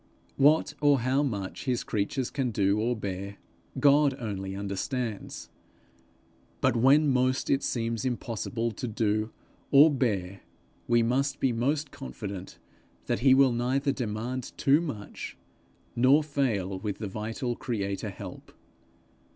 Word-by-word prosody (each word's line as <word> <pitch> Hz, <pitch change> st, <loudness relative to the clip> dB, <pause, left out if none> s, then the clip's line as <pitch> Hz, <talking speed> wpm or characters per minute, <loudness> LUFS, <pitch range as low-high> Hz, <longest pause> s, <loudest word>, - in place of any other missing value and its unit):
What 150 Hz, +2 st, +4 dB
or 145 Hz, -3 st, +4 dB
how 130 Hz, +3 st, +2 dB
much 105 Hz, -8 st, -3 dB
his 125 Hz, -3 st, 0 dB
creatures 115 Hz, +5 st, -2 dB
can 135 Hz, -3 st, -1 dB
do 100 Hz, -1 st, +1 dB
or 120 Hz, +3 st, +1 dB
bear, 100 Hz, -1 st, -5 dB, 0.4 s
God 140 Hz, 0 st, +5 dB
only 95 Hz, -4 st, -4 dB
understands; 100 Hz, +3 st, -4 dB, 1.1 s
but -, -, +2 dB
when 135 Hz, +6 st, +5 dB
most 130 Hz, -1 st, +1 dB
it 135 Hz, -, +3 dB
seems 115 Hz, -2 st, -2 dB
impossible 115 Hz, -1 st, -2 dB
to 115 Hz, +4 st, -5 dB
do 110 Hz, -1 st, 0 dB, 0.4 s
or 145 Hz, +3 st, +7 dB
bear, 100 Hz, -8 st, -1 dB, 0.5 s
we 120 Hz, -1 st, +4 dB
must 135 Hz, +4 st, 0 dB
be 135 Hz, -, +2 dB
most 140 Hz, +5 st, -1 dB
confident 95 Hz, +8 st, -7 dB, 0.5 s
that -, -, -1 dB
he 130 Hz, +1 st, +6 dB
will 135 Hz, -1 st, +5 dB
neither 130 Hz, +4 st, 0 dB
demand 125 Hz, 0 st, -4 dB
too 140 Hz, +4 st, +4 dB
much, 130 Hz, -11 st, -6 dB, 0.6 s
nor 130 Hz, +5 st, +5 dB
fail 110 Hz, -11 st, -1 dB
with 100 Hz, 0 st, -4 dB
the 105 Hz, -, -4 dB
vital 115 Hz, +5 st, -3 dB
creator 100 Hz, -6 st, -3 dB
help. -, -, -9 dB
120 Hz, 130 wpm, -28 LUFS, 105-135 Hz, 1.1 s, or